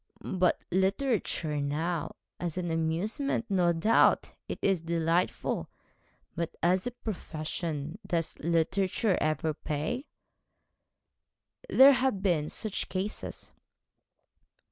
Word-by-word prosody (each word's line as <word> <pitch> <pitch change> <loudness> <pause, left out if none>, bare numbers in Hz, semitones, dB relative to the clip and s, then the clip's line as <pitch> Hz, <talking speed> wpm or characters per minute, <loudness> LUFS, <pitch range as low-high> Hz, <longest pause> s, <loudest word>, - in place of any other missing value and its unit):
'But 185 -1 +2
literature 190 - +1
now 160 +4 -2 0.2
as 175 -1 -3
an 175 -2 -1
amusement, 180 - -1
no 180 -3 +3
doubt, 175 +8 +3 0.2
it - - -4
is 195 -4 +2
delightful 165 +1 0 0.7
but 170 0 -3
as 185 +5 +3
a - - -2
profession 160 -4 -4
does 165 -2 -1
literature 185 +5 +1
ever 155 0 +1
pay?' 180 - -3 1.6
'There 275 +2 +8
have 255 -7 0
been 165 -6 +2
such 215 -3 -3
cases.' 190 +3 -4
175 Hz, 100 wpm, -29 LUFS, 160-200 Hz, 1.6 s, There